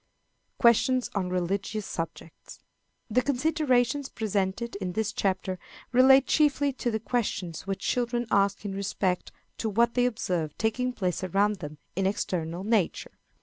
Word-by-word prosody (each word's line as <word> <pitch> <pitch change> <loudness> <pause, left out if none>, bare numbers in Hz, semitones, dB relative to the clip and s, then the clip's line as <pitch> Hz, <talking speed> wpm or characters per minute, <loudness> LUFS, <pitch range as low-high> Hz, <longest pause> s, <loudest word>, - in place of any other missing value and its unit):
Questions 250 +2 +3
on 185 -3 -1
Religious 195 +4 -2
Subjects. 165 0 -7 0.5
The 250 +3 +2
considerations 275 -1 +1
presented 210 +1 -2
in 185 -3 -4
this 220 +2 -1
chapter 185 -1 -1 0.3
relate 265 +2 +7
chiefly 285 -2 +2
to 250 - -2
the 220 -1 -1
questions 200 -7 -2
which 195 0 -3
children 240 +1 0
ask 200 +1 +2
in 200 - -3
respect 195 -2 -1 0.3
to 225 - -1
what 235 +3 +2
they 245 0 +3
observe 175 -9 -2
taking 250 +3 0
place 185 -7 -2
around 200 +3 +2
them 150 -3 -8 0.2
in 190 +1 +1
external 175 -3 -2
nature. 210 -4 0
210 Hz, 140 wpm, -27 LUFS, 185-245 Hz, 0.5 s, relate